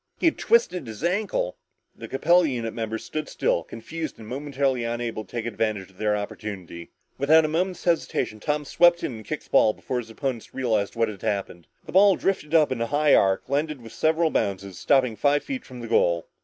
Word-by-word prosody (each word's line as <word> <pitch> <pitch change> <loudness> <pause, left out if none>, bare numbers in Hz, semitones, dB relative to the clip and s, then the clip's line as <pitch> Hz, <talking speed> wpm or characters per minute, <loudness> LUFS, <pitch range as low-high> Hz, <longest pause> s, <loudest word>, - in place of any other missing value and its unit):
He - - -1
had 330 - +3
twisted 180 - +2
his 110 +5 -8
ankle. 180 - -1 0.4
The - - -9
Capella 170 +5 +3
unit 115 -5 -3
members 110 -1 -4
stood 155 -1 -4
still, - - 0
confused 155 - -7
and 110 - -11
momentarily 135 -1 -1
unable 115 -1 -3
to 95 - -23
take 115 -2 -4
advantage 110 -4 -2
of 95 - -24
their 105 -1 +1
opportunity. 100 -5 -7 0.3
Without 155 +3 +5
a - - +1
moment's 180 +4 -1
hesitation, 165 -10 0
Tom 150 +5 -1
swept 175 +4 +4
in 130 - -2
and 110 - -10
kicked - - -4
the - - -23
ball 110 - +5
before 125 +3 -3
his 115 -2 -8
opponents 120 0 -4
realized 110 -6 0
what 115 -1 +2
had 105 -3 -8
happened. 95 -4 -3 0.2
The - - -9
ball 195 +1 +6
drifted 170 -5 -1
up 155 -3 +5
in 125 -3 -2
a 115 - 0
high 145 +2 +3
arc 95 0 +4
and 135 - -6
landed 150 0 0
with 115 - -11
several 160 0 +2
bounces, 95 -2 -2
stopping 130 -5 +3
five 145 +7 +2
feet 265 -3 -5
from 125 -2 -10
the 115 - -6
goal. 85 -7 +2
125 Hz, 210 wpm, -25 LUFS, 110-155 Hz, 0.4 s, ball